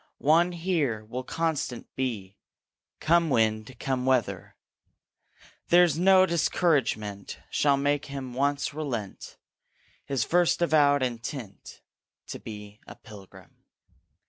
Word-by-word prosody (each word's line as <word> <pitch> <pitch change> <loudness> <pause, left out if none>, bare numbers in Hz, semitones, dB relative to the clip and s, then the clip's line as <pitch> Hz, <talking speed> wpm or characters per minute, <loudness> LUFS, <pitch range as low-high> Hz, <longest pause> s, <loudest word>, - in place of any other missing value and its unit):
One 170 +4 +3
here 160 - -1
will 125 +4 -5
constant 155 -5 -3
be, 105 -7 -4 0.6
Come 170 0 +2
wind, 110 -1 0
come 130 -2 -2
weather; 130 -3 0 1.1
There's 175 -3 +5
no 190 +1 +6
discouragement 130 - 0
Shall 140 -2 +2
make 145 +1 0
him 135 -3 -7
once 140 +3 -1
relent 125 -10 -6 0.7
His 135 -4 -1
first 175 +7 +2
avowed 145 -4 +3
intent 120 -3 -6 0.5
To - - -6
be 105 -1 -10
a - - -10
Pilgrim. 100 -4 -15
135 Hz, 105 wpm, -27 LUFS, 115-160 Hz, 1.1 s, no